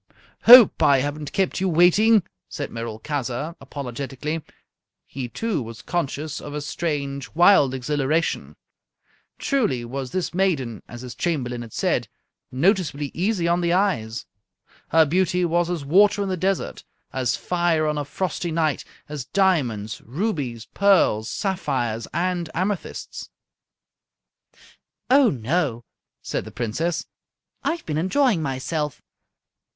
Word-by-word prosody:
"Hope 240 -2 +9
I 140 - +5
haven't 145 +1 -4
kept 190 -1 0
you 190 - +1
waiting," 180 +6 +5 0.3
said - - -5
Merolchazzar, 125 +6 -4
apologetically. 140 +3 -5 0.6
He, 125 -2 -6
too, 220 - -2
was 115 -1 -9
conscious 155 -2 -3
of 145 0 -7
a 150 - -3
strange, 145 -2 -3
wild 170 -7 +5
exhilaration. 145 +4 -1 0.8
Truly 180 - 0
was 130 +2 -5
this 180 +5 -2
maiden, 155 - 0
as 120 0 -9
his 125 -1 -7
Chamberlain 125 -8 -2
had 115 -2 -9
said, - - 0 0.4
noticeably 150 - +1
easy 185 0 0
on 170 +1 +2
the 170 0 +1
eyes. 120 - 0 0.6
Her 160 0 +5
beauty 180 +3 +1
was 175 0 +1
as 170 -5 -3
water 200 +6 +4
in 195 - -3
the 185 - 0
desert, 190 +2 -2 0.3
as 130 -2 0
fire 175 -3 0
on 150 -1 0
a - - -1
frosty 175 +4 -3
night, 155 -2 0 0.2
as 145 -4 -6
diamonds, 125 - 0
rubies, 135 - -3
pearls, 185 - +3
sapphires, 135 - -2
and 175 -1 -1
amethysts. 190 +2 -3 1.8
"Oh, 270 -2 +6
no!" 125 -1 -1 0.4
said - - -3
the - - -10
princess, 155 +9 -2 0.6
"I've 335 0 -2
been 155 -1 -1
enjoying 205 - +2
myself. 150 +2 -3
155 Hz, 125 wpm, -23 LUFS, 130-180 Hz, 1.8 s, Hope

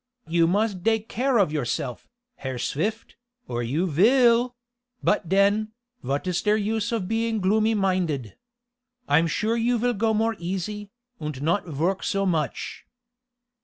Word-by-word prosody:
You 165 0 +3
must 200 +1 0
dake 225 +2 +1
care 255 +2 +1
of 195 -8 +3
yourself, 130 -3 -3 0.3
Herr 130 -2 -5
Swift, 210 - -3 0.3
or 120 0 -2
you 140 +10 0
vill 235 - +4 0.5
but 180 -5 +1
den, 205 +3 +2 0.3
vot 140 +5 -2
is 180 -1 0
der 210 0 +3
use 215 +1 -1
of 220 -6 -1
being 225 0 0
gloomy 215 +3 +2
minded? 180 - -1 0.7
I 145 - +5
am 165 - +1
sure 220 +7 0
you 235 +1 +1
vill 245 +2 +1
go 220 +1 +1
more 225 +1 +1
easy, 195 +4 -4 0.3
und 150 -3 -5
not 170 +5 +1
vork 165 +5 -1
so 195 0 0
much." 160 -6 -2
195 Hz, 150 wpm, -25 LUFS, 165-220 Hz, 0.7 s, I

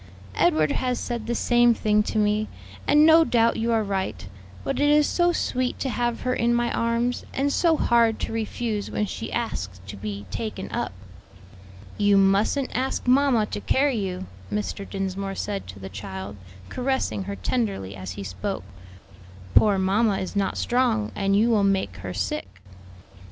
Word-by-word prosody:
Edward 155 - +3
has 250 -2 0
said 235 -2 -4
the 240 - -1
same 240 -1 +4
thing 210 -1 +2
to 210 - -3
me, 210 0 +2 0.4
and 295 +1 +6
no 325 +1 +7
doubt 235 -6 +2
you 230 +1 0
are 225 -1 +2
right; 190 - -3 0.4
but - - -2
it 290 0 +3
is 300 0 +5
so 350 +3 +2
sweet 255 -6 -1
to 270 - -2
have 240 -1 -1
her 255 - 0
in 240 -1 +2
my 240 0 +1
arms, 235 +1 0
and 280 +1 +1
so 330 -3 +3
hard 230 -4 +3
to - - -3
refuse 220 -1 -2
when 210 - -1
she - - -6
asks 95 - -3
to 100 +1 -8
be 100 0 -6
taken 215 -4 -5
up." - - -2 1.1
"You 205 -1 +4
mustn't 200 +8 +2
ask 260 +1 -1
mamma 255 -4 +4
to - - -4
carry 270 +1 +2
you," 190 -2 -3 0.3
Mr. 210 -1 -3
Dinsmore 195 0 -3
said 200 0 -4
to 95 +2 -9
the 95 -1 -8
child, 95 0 -7 0.3
caressing 260 -6 -1
her 200 +1 -4
tenderly 200 - -2
as 95 0 -6
he 100 - -7
spoke; 95 -1 -4 0.9
"poor 205 -2 +5
mamma 195 +2 +2
is 190 - -5
not 195 -1 0
strong, 240 -4 +1
and 195 -1 +1
you 225 +4 +3
will 210 -3 +3
make 190 - 0
her 95 -1 -6
sick." 95 -1 -2
215 Hz, 170 wpm, -25 LUFS, 190-240 Hz, 1.1 s, no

